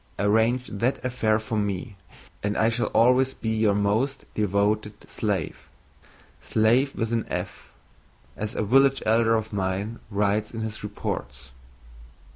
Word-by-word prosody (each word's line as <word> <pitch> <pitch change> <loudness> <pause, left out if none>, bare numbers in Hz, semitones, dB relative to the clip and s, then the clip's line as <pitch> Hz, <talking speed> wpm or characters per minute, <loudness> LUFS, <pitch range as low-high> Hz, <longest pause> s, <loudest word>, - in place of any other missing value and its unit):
"Arrange 110 +5 +2
that 115 +6 0
affair 115 -4 +1
for 110 0 -2
me 100 +1 -3 0.5
and 105 +1 -1
I 110 - +3
shall 115 +1 0
always 130 +3 +3
be 110 - -4
your 110 -2 +2
most 110 +7 0
devoted 105 +1 0
slave 100 -8 -3 0.7
slafe 120 +6 +2
with 115 0 -2
an 115 -1 -1
f, - - -5 0.6
as 105 0 -4
a - - 0
village 135 +5 +4
elder 115 +1 +3
of 110 -1 -3
mine 100 +3 -2
writes 105 +2 0
in 110 - -4
his 110 0 -5
reports. 70 -10 -5
110 Hz, 135 wpm, -25 LUFS, 105-115 Hz, 0.7 s, village